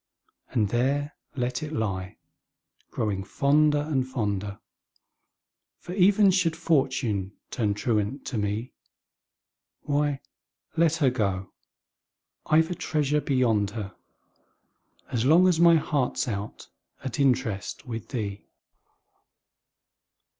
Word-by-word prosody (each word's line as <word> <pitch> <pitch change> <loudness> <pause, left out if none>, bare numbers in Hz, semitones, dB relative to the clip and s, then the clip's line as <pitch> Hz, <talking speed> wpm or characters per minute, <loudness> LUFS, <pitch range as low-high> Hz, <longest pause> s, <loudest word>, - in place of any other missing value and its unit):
And 105 -4 +1
there 140 +6 0 0.2
let 125 +2 -2
it 155 0 -5
lie, 95 -8 -3 0.7
growing 100 -3 -2
fonder 150 +7 +3
and, 135 -4 -1
fonder 105 -5 -3 1.2
For, 175 - -8
even 195 +1 +5
should 180 -3 +1
Fortune 130 - 0 0.2
turn 105 -4 0
truant 110 +4 -1
to 120 - -2
me, 105 +4 -2 1.1
Why, 145 -1 0 0.6
let 165 -1 +3
her 140 -6 +2
go 95 -6 -2 1.0
I've 160 +2 +3
a - - +1
treasure 150 -3 0
beyond 115 -8 +2
her, 100 -3 -5 1.2
As 115 -2 0
long 165 +7 +6
as 175 -3 +2
my 170 -1 +7
heart's 145 -4 0
out 105 -2 -5 0.3
at 130 +1 -4
interest 125 -5 0
With 115 -3 -6
thee! 105 -6 -5
130 Hz, 105 wpm, -26 LUFS, 105-150 Hz, 1.2 s, my